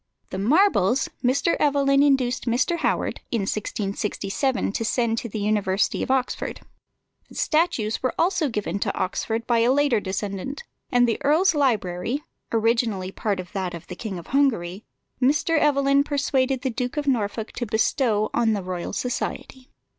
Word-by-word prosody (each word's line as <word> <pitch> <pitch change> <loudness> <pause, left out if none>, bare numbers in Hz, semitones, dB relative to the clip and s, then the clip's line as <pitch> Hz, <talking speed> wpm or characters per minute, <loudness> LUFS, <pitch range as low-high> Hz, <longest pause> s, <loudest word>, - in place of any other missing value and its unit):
The 190 - -3
marbles 260 - +3
Mr. 265 +6 +2
Evelyn 280 -1 +3
induced 265 -3 +2
Mr. 250 +9 +1
Howard, - - -1
in 230 - 0
1667, 205 +4 -2
to 225 - -2
send 230 0 0
to 235 - -6
the 215 - -5
University 205 -2 +1
of - - -3
Oxford; 260 -1 -1 0.7
the - - -15
statues 280 -10 +1
were 255 - -1
also 335 -4 +2
given 205 -4 -2
to - - -2
Oxford 225 +4 -2
by 235 -1 +2
a 235 +2 +4
later 280 -4 +3
descendant; 200 - -4 0.3
and 245 -1 +4
the 230 - -1
earl's 315 +7 +4
library 240 - 0 0.3
(originally 225 -4 +1
part 200 -1 -2
of 180 -1 -7
that 185 -3 -3
of 170 0 -9
the - - -8
King 210 -6 -5
of 170 - -9
Hungary) 220 -9 +1 0.4
Mr. 300 +4 +3
Evelyn 280 -1 +3
persuaded 270 -3 0
the 260 - 0
Duke 250 +3 -3
of 295 - -1
Norfolk 220 -4 -1
to 240 - -4
bestow 220 0 +1
on 230 -2 +2
the 200 -3 -2
Royal 180 -1 -4
Society. 255 +2 -4
235 Hz, 160 wpm, -24 LUFS, 205-275 Hz, 0.7 s, a